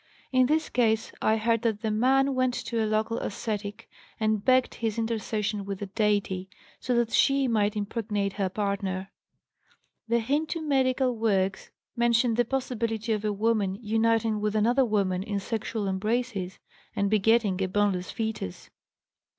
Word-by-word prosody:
In 255 -1 +4
this 310 +3 +1
case 225 -2 +1
I 220 - +3
heard 230 0 +1
that 225 -2 -1
'the 220 - 0
man' 270 +5 +3
went 255 -1 +1
to 230 -2 -2
a 215 - -1
local 220 +2 0
ascetic 205 -1 -4 0.3
and 215 -2 +1
begged 255 -1 +3
his 225 -1 -3
intercession 215 -2 -2
with 195 0 -4
the 205 - -5
deity, 200 -2 0 0.3
so 250 - -1
that 235 -1 +1
she 275 -1 +3
might 210 -2 +1
impregnate 205 -1 -2
her 195 -2 -1
partner. 195 -1 -2 1.0
('The 235 +1 +2
Hindoo 305 +7 -1
medical 260 -3 +1
works 195 -4 0 0.3
mention 235 0 +3
the 240 +2 +2
possibility 230 -3 -2
of 210 -1 -2
a 210 - +1
woman 205 -2 +1
uniting 225 -1 +1
with 210 0 -1
another 240 +5 +3
woman 195 -5 0
in 200 0 -2
sexual 215 0 -3
embraces 200 -1 -2 0.4
and 200 - +1
begetting 210 -1 +2
a 190 - +1
boneless 190 -2 0
fetus.' 220 - -5
220 Hz, 150 wpm, -27 LUFS, 205-235 Hz, 1.0 s, In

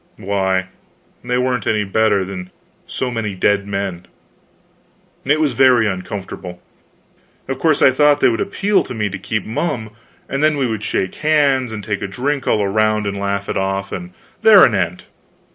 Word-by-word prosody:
Why, 95 -1 0 0.6
they 125 0 -1
weren't 125 -2 -1
any 105 -2 +1
better 100 -1 +1
than 90 -1 -7 0.4
so 125 - -3
many 110 -4 -3
dead 100 +2 +1
men. 100 -3 -4 1.2
It 145 +3 +2
was 150 -4 +1
very 125 -2 +4
uncomfortable. 95 -2 -5 0.9
Of 135 0 -4
course, 155 -1 +2
I 130 - +7
thought 145 +2 +3
they - - +4
would 115 - -1
appeal 200 0 +1
to 125 - -7
me 105 -2 -1
to 100 0 -6
keep 110 +1 -3
mum, 115 -2 -3 0.4
and 135 +1 -2
then 155 -1 +3
we 135 - +1
would 110 -3 -3
shake 95 -3 -1
hands, 140 -5 +2
and 110 -2 -6
take 100 -1 -3
a 105 - -3
drink 135 +7 -2
all 105 -2 +2
round, 110 +1 +1
and 100 0 -2
laugh 100 0 -2
it - - -2
off, 95 0 -2
and 180 0 -6 0.3
there 215 -3 +8
an 120 - +1
end. 90 -2 -1
110 Hz, 180 wpm, -18 LUFS, 100-130 Hz, 1.2 s, there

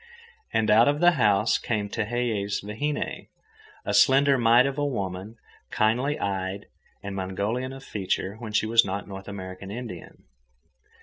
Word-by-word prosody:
And 110 -1 +2
out 115 +3 +6
of 145 +1 +2
the 175 +1 +6
house 105 - +2
came 105 -3 -2
Tehei's 110 -2 -2
vahine, 145 +9 -3 0.6
a - - -1
slender 140 0 +5
mite 120 0 +5
of 140 +1 -2
a - - 0
woman, 100 -5 -3 0.3
kindly 125 +7 +1
eyed 95 0 -3 0.4
and 100 -1 -5
Mongolian 100 +7 -2
of 135 0 -10
feature—when 105 0 -3
she 110 - +2
was 115 +1 +5
not 100 +1 -4
North 95 -1 -9
American 95 -1 -7
Indian. 110 -5 -8
110 Hz, 140 wpm, -26 LUFS, 100-125 Hz, 0.6 s, out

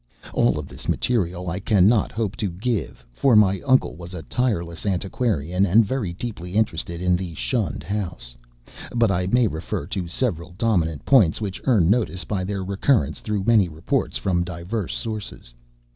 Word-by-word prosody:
All - - +3
of - - -5
this - - -7
material 90 -7 0
I 90 +3 -2
cannot 105 +2 +3
hope 110 -2 -2
to 105 - -1
give, 100 - -3
for 125 - +3
my 100 -2 +4
uncle 130 - +3
was 85 +2 -9
a 80 - -6
tireless 85 -8 -1
antiquarian 95 - 0
and 105 +4 +5
very 115 -5 -2
deeply 90 -2 -6
interested 85 -5 -1
in 90 0 +3
the 90 -2 -4
shunned 115 - -2
house; 90 -12 -4 0.6
but 115 -3 +3
I 90 -1 0
may 120 +5 +3
refer 80 -6 -3
to 90 +2 -4
several 90 -3 -2
dominant 85 -10 0
points 110 - +5
which 100 -4 -4
earn 110 -11 +4
notice 105 -6 0
by 100 -3 -2
their 95 0 -3
recurrence 95 - +1
through 105 -2 -2
many 105 -5 +4
reports 80 +1 -1
from 90 -3 0
diverse 90 +3 -4
sources. 110 - -6
95 Hz, 165 wpm, -23 LUFS, 85-110 Hz, 0.6 s, and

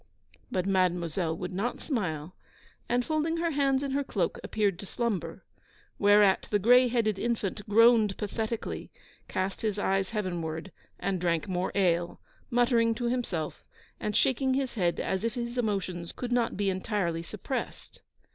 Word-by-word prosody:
But 185 -1 -1
Mademoiselle 175 -3 +1
would 180 +1 -5
not 210 +7 -2
smile; 180 - -3 0.5
and, 245 0 +1
folding 315 +1 0
her 335 0 0
hands 275 -2 +2
in 275 - -2
her 280 +1 +1
cloak, 195 -10 -1
appeared 200 -4 0
to 200 - -7
slumber. 230 -5 -3 0.5
Whereat 205 -1 +5
the 210 - +3
gray 245 +5 +6
headed 225 -4 +1
infant 215 -4 -1
groaned 225 -2 +5
pathetically, 220 +2 -3 0.4
cast 190 +1 -2
his 215 -2 -1
eyes 195 -1 +1
heavenward, 175 -5 -3 0.3
and 190 -3 -1
drank 170 0 0
more 185 -1 -1
ale, 175 -3 +1 0.3
muttering 235 -1 +3
to 240 0 -1
himself, 190 -11 -2 0.4
and 210 -1 -1
shaking 265 0 +2
his 270 -2 -1
head 175 -6 0
as 190 +1 -1
if 230 +1 -1
his 240 0 -3
emotions 195 -7 -2
could 245 -1 -5
not 240 -4 +1
be 200 -1 +1
entirely 185 -3 -1
suppressed. 215 +8 -6
210 Hz, 150 wpm, -29 LUFS, 185-240 Hz, 0.5 s, gray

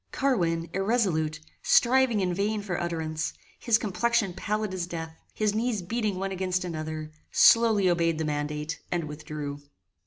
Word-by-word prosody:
Carwin, 170 -12 +1
irresolute, 190 -7 +1 0.2
striving 250 -3 +4
in 180 -1 0
vain 205 +3 -1
for 180 -3 -2
utterance, 160 -2 -2 0.3
his 230 -2 +3
complexion 215 0 0
pallid 210 +1 -2
as 180 -2 -3
death, 160 -2 -6 0.2
his 210 -1 0
knees 220 -3 -1
beating 215 0 -1
one 195 +1 -2
against 185 -1 -1
another, 155 -2 -5 0.2
slowly 225 -4 +6
obeyed 170 -2 +2
the 160 - -1
mandate 150 +1 -3
and 175 -1 0
withdrew. 150 -1 -6
180 Hz, 145 wpm, -27 LUFS, 160-215 Hz, 0.3 s, slowly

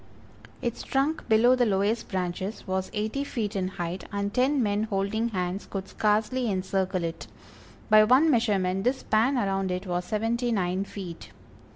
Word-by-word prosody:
Its 235 -1 -2
trunk 285 +3 -1
below 230 +3 +5
the 250 - +2
lowest 205 +1 +1
branches 185 +2 -3
was 190 -1 -2
eighty 220 +6 -2
feet 225 -6 -3
in 185 -2 0
height, 175 0 -4
and 200 0 -2
ten 260 +1 +2
men 205 -1 +1
holding 215 +2 -1
hands 185 -1 -3
could 195 -1 -4
scarcely 220 +5 +1
encircle 190 -1 -1
it; 165 0 -5 0.6
by 215 0 +7
one 260 +8 +5
measurement 195 -6 +1
this 260 +3 +1
span 230 +6 +2
around 195 -4 0
it 180 +2 -3
was 180 -1 -1
seventy 230 +5 -1
nine 185 -2 0
feet. 190 -4 -8
205 Hz, 160 wpm, -27 LUFS, 190-235 Hz, 0.6 s, by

